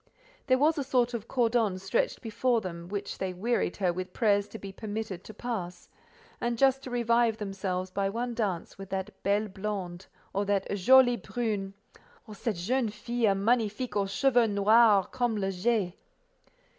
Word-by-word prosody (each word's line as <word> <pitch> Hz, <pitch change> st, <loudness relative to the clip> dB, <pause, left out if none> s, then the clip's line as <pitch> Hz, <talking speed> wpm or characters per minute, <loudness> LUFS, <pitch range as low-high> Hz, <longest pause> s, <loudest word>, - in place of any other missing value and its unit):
There 255 Hz, -1 st, +4 dB
was 300 Hz, +3 st, +3 dB
a -, -, 0 dB
sort 250 Hz, -2 st, +1 dB
of 230 Hz, -1 st, -4 dB
cordon 230 Hz, -5 st, +1 dB
stretched 195 Hz, +7 st, -1 dB
before 235 Hz, +2 st, +1 dB
them, 170 Hz, -4 st, -7 dB
which 200 Hz, +1 st, -5 dB
they 190 Hz, -1 st, -2 dB
wearied 220 Hz, -1 st, -1 dB
her 185 Hz, -3 st, +1 dB
with 185 Hz, +1 st, -5 dB
prayers 205 Hz, -3 st, +2 dB
to -, -, -9 dB
be 195 Hz, -2 st, -8 dB
permitted 205 Hz, -2 st, -5 dB
to -, -, -8 dB
pass, 215 Hz, -5 st, -5 dB, 0.5 s
and 235 Hz, 0 st, -1 dB
just 270 Hz, +1 st, +3 dB
to 260 Hz, -, -8 dB
revive 235 Hz, -2 st, +2 dB
themselves 190 Hz, -3 st, -3 dB
by 195 Hz, +1 st, 0 dB
one 240 Hz, +4 st, -3 dB
dance 200 Hz, -6 st, -3 dB
with 195 Hz, -1 st, -8 dB
that 190 Hz, +2 st, -5 dB
"belle 205 Hz, +2 st, +1 dB
blonde," 190 Hz, -2 st, -5 dB, 0.3 s
or 200 Hz, -, 0 dB
that 200 Hz, -1 st, +1 dB
"jolie 245 Hz, +5 st, +6 dB
brune," 210 Hz, -6 st, -3 dB, 0.5 s
or 215 Hz, -, -10 dB
"cette 210 Hz, +1 st, -2 dB
jeune 230 Hz, +7 st, 0 dB
fille 215 Hz, 0 st, 0 dB
magnifique 220 Hz, +2 st, 0 dB
aux 200 Hz, -1 st, +1 dB
cheveux 245 Hz, +3 st, +3 dB
noirs 205 Hz, 0 st, +5 dB
comme 245 Hz, -3 st, 0 dB
le 195 Hz, -1 st, -1 dB
jais." 195 Hz, -1 st, 0 dB
210 Hz, 170 wpm, -29 LUFS, 195-240 Hz, 0.5 s, jolie